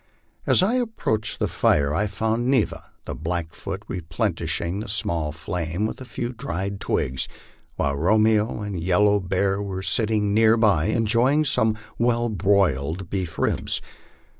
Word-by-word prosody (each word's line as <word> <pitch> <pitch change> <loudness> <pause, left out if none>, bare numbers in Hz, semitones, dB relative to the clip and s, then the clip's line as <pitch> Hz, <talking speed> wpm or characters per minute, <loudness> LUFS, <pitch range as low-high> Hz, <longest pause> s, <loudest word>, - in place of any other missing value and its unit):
As - - +5
I 230 +7 +2
approached 160 - -1
the - - 0
fire 70 0 +2
I 105 +7 +1
found 110 +4 -1
Neva, 130 -5 +1 0.2
the - - -4
Blackfoot, 85 +4 -4
replenishing 85 +1 -2
the 110 0 -5
email 80 -3 -1
flame 85 +4 -3
with 110 - -5
a - - -7
few 120 +1 -4
dried 100 -6 -4
twigs, 65 -8 -1 0.5
while 70 0 0
Romeo 110 +6 +2
and 100 -4 -4
Yellow 100 +4 +3
Bear 95 +1 0
were 95 -2 -4
sit 110 +2 +2
ting 105 -2 +1
near 110 +1 +5
by 100 -9 +3
enjoying 120 +7 +2
some 110 -5 +1 0.2
well 120 0 +2
broiled 95 -5 +1
beef 90 -4 -3
ribs. - - 0
100 Hz, 145 wpm, -24 LUFS, 85-110 Hz, 0.5 s, As